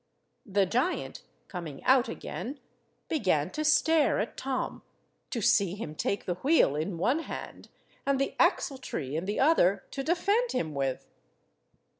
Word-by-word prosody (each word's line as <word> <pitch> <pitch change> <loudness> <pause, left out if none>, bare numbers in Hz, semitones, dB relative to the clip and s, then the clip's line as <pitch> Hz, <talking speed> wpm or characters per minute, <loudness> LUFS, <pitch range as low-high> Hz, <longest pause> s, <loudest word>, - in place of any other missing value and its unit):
The 200 -1 +2
giant, 250 - -1 0.3
coming 165 -7 -7
out 260 -1 +4
again, 275 +4 -6 0.5
began 185 - +1
to 310 - -3
stare 310 -1 +4
at 210 - -3
Tom, 265 -1 -3 0.5
to 235 - -3
see 195 -2 +3
him 180 -8 -6
take 200 +5 -2
the 180 - 0
wheel 280 - +4
in 165 +4 -2
one 245 - +2
hand, 330 - -7 0.3
and 275 -1 +1
the 275 - 0
axle–tree 155 - 0
in 165 +3 -2
the 205 +2 -2
other, 265 - +4
to 275 - -3
defend 400 - +1
him 160 -11 -1
with. 135 -2 -2
230 Hz, 145 wpm, -29 LUFS, 175-285 Hz, 0.5 s, out